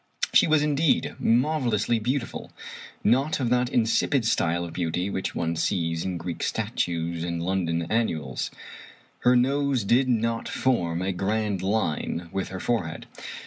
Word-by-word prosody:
She - - +6
was, 155 -2 +4
indeed, 150 +1 +2
marvelously 120 -3 +2
beautiful. 125 +3 -3 0.5
Not 135 +8 +2
of 120 -3 0
that 125 0 +2
insipid 120 +1 +2
style 85 -5 +1
of 85 - -8
beauty 90 +2 -1
which 95 - -3
one 85 0 -1
sees 80 -1 0
in 90 -2 -2
Greek 85 0 -5
statues 85 -1 -1
and 85 -1 -2
London 85 -2 0
annuals. 80 - -1 0.7
Her 125 +1 +4
nose 135 0 +2
did 125 +6 +3
not 115 -1 0
form 90 -9 0
a 95 - 0
grand 100 +1 -1
line 90 -4 -1
with 95 -1 -1
her 95 - -6
forehead. 90 -8 -2
105 Hz, 145 wpm, -26 LUFS, 85-125 Hz, 0.7 s, She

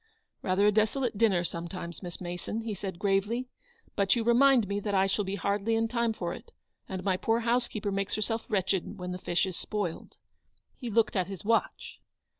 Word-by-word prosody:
"Rather 185 +2 +2
a 210 - +6
desolate 220 +3 +1
dinner, 200 -5 +3
sometimes, 170 0 -5
Miss 175 -3 -7
Mason," 175 +5 -4
he 225 -1 -3
said, 190 -2 -5
gravely; 205 +6 0 0.2
" - - -33
but 195 -1 +3
you 235 - 0
remind 240 -1 +5
me 200 +1 -1
that 205 0 -2
I 190 0 +4
shall 195 +2 0
be 195 +1 -3
hardly 205 +3 0
in 225 0 +2
time 235 0 +1
for 175 -5 -3
it, 470 - -11 0.4
and 190 -1 -4
my 190 -2 +1
poor 225 +5 +1
housekeeper 235 -3 0
makes 195 0 -1
herself 225 +1 -1
wretched 190 -3 0
when 180 0 -5
the 180 - -4
fish 175 +1 +1
is 185 -2 -4
spoiled." 200 -5 -4 0.6
He 245 - -6
looked 220 0 +2
at 185 -2 +1
his 195 0 -7
watch. 225 +1 0
205 Hz, 200 wpm, -29 LUFS, 190-225 Hz, 0.6 s, a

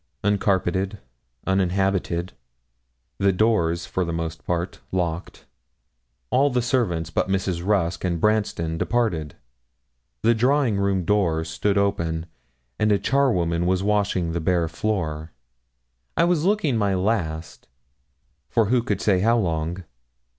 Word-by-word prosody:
Uncarpeted, 100 -1 +1 0.5
uninhabited, 95 -2 0 1.0
doors 85 -6 +2
for 95 - -1
the 85 - -3
most 80 -1 -4
part 85 +1 -2
locked, 85 -1 -3 0.9
all 140 +2 +4
the 125 -2 +1
servants 90 - 0
but 95 - 0
Mrs. 95 -3 -1
Rusk 90 -4 0
and 85 -2 0
Branston 95 -6 0
departed. 90 - 0 0.9
The 115 - +5
drawing 125 -1 +2
room 100 -3 0
door 85 -5 +1
stood 100 +5 -1
open, 85 -5 0 0.5
and 105 0 +3
a 100 - +4
charwoman 90 -12 +1
was 95 +1 +1
washing 100 -4 +1
the 85 0 -2
bare 85 0 +1
floor. 80 -4 -3 0.8
I - - +4
was 170 -2 +2
looking 185 - +2
my 100 -3 +1
last 90 -5 -2 0.8
for 115 -2 +2
who 125 - +4
could 105 -5 -2
say 95 -3 +3
how 115 +5 +3
long? 85 -2 -1
95 Hz, 125 wpm, -23 LUFS, 85-105 Hz, 1.0 s, The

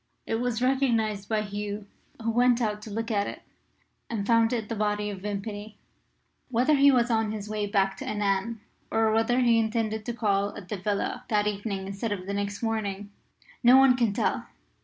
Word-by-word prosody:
It 225 +1 -1
was 245 -1 -1
recognised 230 -6 +1
by 215 -1 +1
Hugh, 205 0 -5 0.4
who 230 - +1
went 245 +1 +4
out 210 -3 -1
to 215 - -9
look 225 +2 -3
at 205 -1 +1
it, - - -7 0.7
and 215 -4 -2
found 230 0 +4
it 225 -4 -2
the 230 - -3
body 210 0 -1
of 195 -2 -8
Vimpany. 205 +1 -5 0.7
Whether 255 +5 +3
he 280 -1 +6
was 245 -2 +2
on 220 -1 +1
his 210 -1 -5
way 210 -1 -2
back 195 -1 +1
to - - -7
Annan, 205 +1 -1 0.3
or 225 -1 +2
whether 225 +3 +2
he 235 -2 +4
intended 220 -1 -1
to 240 - -1
call 200 -3 0
at 185 - -10
the 210 - -3
villa 200 +2 -2
that 210 -3 +2
evening 200 -1 -2
instead 200 +3 -4
of 190 -3 -3
next 200 +1 -3
morning, 205 -3 -2 0.5
no 245 +1 +7
one 265 -1 +6
can 235 -4 +2
tell. 200 - -1
215 Hz, 190 wpm, -27 LUFS, 205-230 Hz, 0.7 s, no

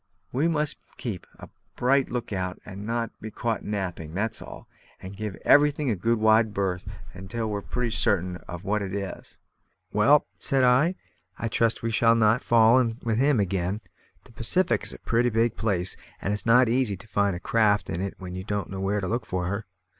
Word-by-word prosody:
We 140 +6 +1
must 150 -3 0 0.2
keep 110 -9 -5
a - - -11 0.3
bright 135 +2 +2
look 120 -3 -4
out, 90 -1 -3
and 100 +3 -8
not 115 0 -1
be 110 - -5
caught 115 +1 -2
napping, 90 -6 -4
that's 110 +3 -2
all; - - -10 0.3
and 95 +1 -9
give 105 -2 -4
everything 145 -2 +4
a - - +1
good 115 +6 +1
wide 110 -1 +3
berth 95 -1 -1 0.4
till 110 +2 -3
we're 100 -1 -2
pretty 120 +2 -2
certain 90 -4 +1
of 90 0 -7
what 105 +1 0
it 95 -1 -4
is." 100 -2 -6 0.6
"Well," 140 +9 +5
said 135 -3 +2
I, 130 +9 +4 0.4
"I 115 - -2
trust 115 +1 +1
we 115 - 0
shall 115 +1 +4
not 115 +1 +3
fall 115 +1 +5
in 115 -3 0
with 115 -1 0
him 140 -2 +3
again. 95 +1 -1 0.4
The - - -18
Pacific 115 +12 +1
is - - -4
a - - -9
pretty 120 +1 +1
big 115 0 +1
place, 95 -5 0 0.2
and 100 - -1
it's 105 - -4
not 125 +2 +6
so 115 - -1
easy 120 -6 +1
to 105 - -12
find 100 -3 +1
a - - -5
craft 105 0 +2
in 85 - -3
it 100 0 -3
when 90 -1 -8
you 95 0 -5
don't 105 -2 -3
know 95 - -5
where 100 +1 0
to 95 - -2
look 115 +3 -2
for 90 -1 -2
her. 100 +4 -3
110 Hz, 205 wpm, -26 LUFS, 95-120 Hz, 0.6 s, not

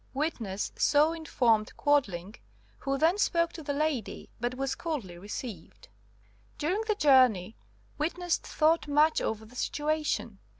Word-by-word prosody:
Witness 230 -10 -2
so 300 +2 +4
informed 240 -9 +1
Quadling, 210 - +1 0.5
who 275 0 -1
then 330 +7 +3
spoke 335 -4 +1
to 330 - -8
the 285 - -3
lady, 285 -6 -2
but 240 +2 -2
was 270 +1 -2
coldly 275 - -4
received. 205 - -8 0.7
"During 360 +8 0
the 430 - +2
journey 255 - +4 0.4
witness 345 +3 0
thought 320 +1 +1
much 300 +2 +3
over 220 0 -3
the 235 +3 -16
situation. 300 -7 -2
285 Hz, 130 wpm, -29 LUFS, 220-315 Hz, 0.7 s, so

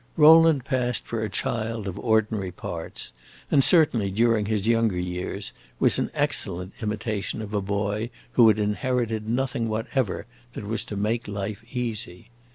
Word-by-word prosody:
Rowland 160 -3 +7
passed 125 -3 -1
for 115 -1 -3
a 110 - -2
child 110 +1 -2
of 95 +1 -5
ordinary 110 -3 +1
parts, 85 -2 -5 0.4
and 135 - +5
certainly, 130 - +4
during 110 +1 +2
his 105 -2 -1
younger 115 -4 +2
years, 90 0 -4 0.3
was - - +6
an - - -1
excellent 90 +2 -1
imitation 105 -1 -3
of 105 -1 -7
a 105 - 0
boy 100 +3 -2 0.2
who 120 -2 +6
had 110 -1 +4
inherited 110 +1 -1
nothing 120 -2 -1
whatever 110 0 -2 0.3
that 105 - -7
was 110 +2 -2
to 105 - -6
make 110 +3 -1
life 100 +1 -5
easy. 115 -4 -4
110 Hz, 155 wpm, -25 LUFS, 100-120 Hz, 0.4 s, Rowland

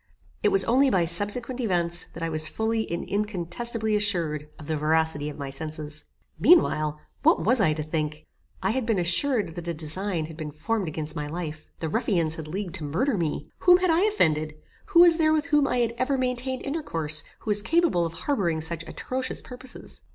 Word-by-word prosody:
It 430 - +3
was 390 -1 +5
only 265 +4 +4
by 185 -7 +2
subsequent 205 +9 +1
events, 175 -7 +1
that 165 - -7
I 165 - -1
was 155 -1 +1
fully 220 +4 -1
and 170 - -4
incontestibly 210 +3 +2
assured 170 -8 0
of 150 - -11
the 155 - -2
veracity 155 -1 0
of 150 - -9
my 140 -2 -5
senses. 155 +1 -5 0.3
Meanwhile 155 - +4 0.2
what - - +3
was 240 +2 +3
I 155 -6 +3
to 155 0 -4
think? 155 0 -3 0.4
I 190 - +2
had 260 +2 -1
been 225 -3 +1
assured 185 - +2
that 175 0 -7
a 170 - -2
design 165 +2 -3
had 160 0 -10
been 155 -2 -5
formed 195 +7 -2
against 155 0 -3
my 150 -2 -3
life. 155 -1 -6
The 160 - -1
ruffians 170 -4 0
had 160 -2 -7
leagued 185 +1 -5
to 160 - -8
murder 185 - 0
me. 160 -4 -3
Whom 355 -1 +6
had 365 -1 +1
I 325 +2 +3
offended? 155 - +1 0.3
Who 345 -4 +5
was 340 -2 +7
there 310 -2 +3
with 305 -2 +1
whom 290 -1 +2
I 250 - 0
had 235 -2 +1
ever 265 +2 +1
maintained 255 0 -2
intercourse, 165 - -1 0.2
who 215 - -2
was 205 0 +1
capable 325 - +2
of 165 -1 -3
harbouring 170 - -1
such 160 +1 -3
atrocious 255 0 -3
purposes? 250 0 -6
175 Hz, 200 wpm, -25 LUFS, 155-250 Hz, 0.4 s, was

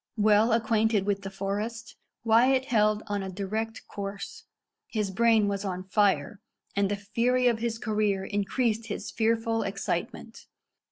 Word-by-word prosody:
Well 215 +2 +4
acquainted 220 -2 +2
with 200 -1 0
the 195 - -6
forest, 210 +4 -4 0.3
Wyat 250 +4 +4
held 215 -3 +2
on 205 -1 -2
a 190 - -4
direct 215 +4 -4
course. 200 0 -7 0.4
His 210 - -2
brain 225 0 +3
was 200 0 -2
on 185 -2 -3
fire, 195 -2 +1 0.3
and 200 -1 +2
the 205 - 0
fury 235 +5 0
of 235 -2 +2
his 230 -1 -2
career 210 -3 0
increased 215 +3 -1
his 205 - -5
fearful 225 0 +1
excitement. 195 -1 -4
210 Hz, 145 wpm, -27 LUFS, 200-225 Hz, 0.4 s, Well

